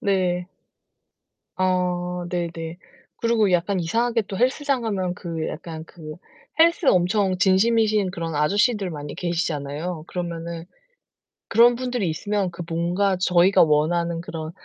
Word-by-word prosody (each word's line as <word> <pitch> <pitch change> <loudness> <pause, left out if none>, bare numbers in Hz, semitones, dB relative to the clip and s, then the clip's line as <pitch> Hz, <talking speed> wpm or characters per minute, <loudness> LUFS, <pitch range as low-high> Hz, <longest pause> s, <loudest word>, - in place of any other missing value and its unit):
네. 180 -3 0 1.1
아, 180 -1 0
네네. 170 -1 -4 0.4
그리고 230 -3 +2
약간 180 +2 +1
이상하게 230 +7 0
또 195 -1 -6
헬스장 265 +2 +1
가면 190 -5 -2
그 165 -3 -4
약간 160 -1 -7
그 155 -3 -10 0.4
헬스 335 +2 +4
엄청 185 0 +3
진심이신 210 +1 +3
그런 165 -3 -4
아저씨들 200 +6 +2
많이 145 -3 -7
계시잖아요. 160 -1 -3
그러면은 170 -1 -5 0.8
그런 240 +1 +5
분들이 245 -6 -2
있으면 195 +4 -1
그 175 0 -7
뭔가 180 +4 0
저희가 180 +1 +4
원하는 165 +2 +1
그런 160 -2 -6
180 Hz, 275 characters per minute, -23 LUFS, 170-205 Hz, 1.1 s, 그런